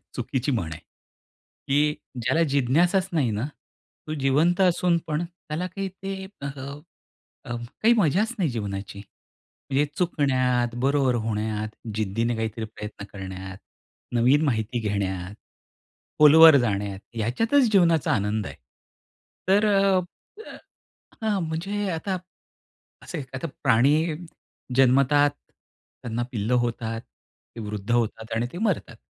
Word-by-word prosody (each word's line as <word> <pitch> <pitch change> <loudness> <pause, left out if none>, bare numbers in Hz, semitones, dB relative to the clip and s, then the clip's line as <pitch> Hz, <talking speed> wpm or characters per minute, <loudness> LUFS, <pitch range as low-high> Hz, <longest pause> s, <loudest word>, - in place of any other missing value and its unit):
चुकीची 130 +2 -2
म्हण 85 -9 -2
आहे. 80 - -8 0.9
की 150 +2 +3 0.3
ज्याला 160 +8 +2
जिज्ञासाच 175 +9 +3
नाही 140 -8 +1
ना, 110 +5 -2 0.6
तो 155 - -3
जिवंत 155 +7 +2
असून 175 -1 +3
पण 155 +2 -1
त्याला 170 -1 -6
काही 195 +1 -4
ते 195 0 -4 0.2
अ, - - -3 1.0
अ, 120 0 -4 0.3
काही 235 +2 +6
मजाच 205 - +2
नाही 170 -6 +1
जीवनाची. 100 -4 -5 0.7
म्हणजे 140 +2 +3
चुकण्यात, 130 -8 +1
बरोबर 135 -2 +3
होण्यात, 110 0 -2 0.3
जिद्दीने 115 +3 0
काहीतरी 110 0 -3
प्रयत्न 105 -1 -8
करण्यात, 95 -1 -7 0.6
नवीन 125 +6 +4
माहिती 115 -3 0
घेण्यात, 95 -1 -2 0.8
खोलवर 155 0 +9
जाण्यात, 100 -4 -2
ह्याच्यातच 225 - +2
जीवनाचा 170 -6 +4
आनंद 105 0 0
आहे. - - -8 0.9
तर 200 +2 +4
अ, 195 -1 +4 0.5
अ, - - -9 0.7
हां 210 -3 +1
म्हणजे 195 +5 -2
आता 185 +3 -2 0.9
असे 170 -5 -5
आता 130 +6 -3 0.2
प्राणी 130 +2 +4 0.8
जन्मतात, 140 +3 +5 0.7
त्यांना 120 0 -2
पिल्लं 110 +2 0
होतात, 115 -1 -3
ती 115 - -17
वृद्ध 105 0 -5
होतात 115 -1 -1
आणि 115 +2 0
ते 175 - -6
मरतात. 195 - -1
130 Hz, 120 wpm, -25 LUFS, 110-170 Hz, 1.0 s, खोलवर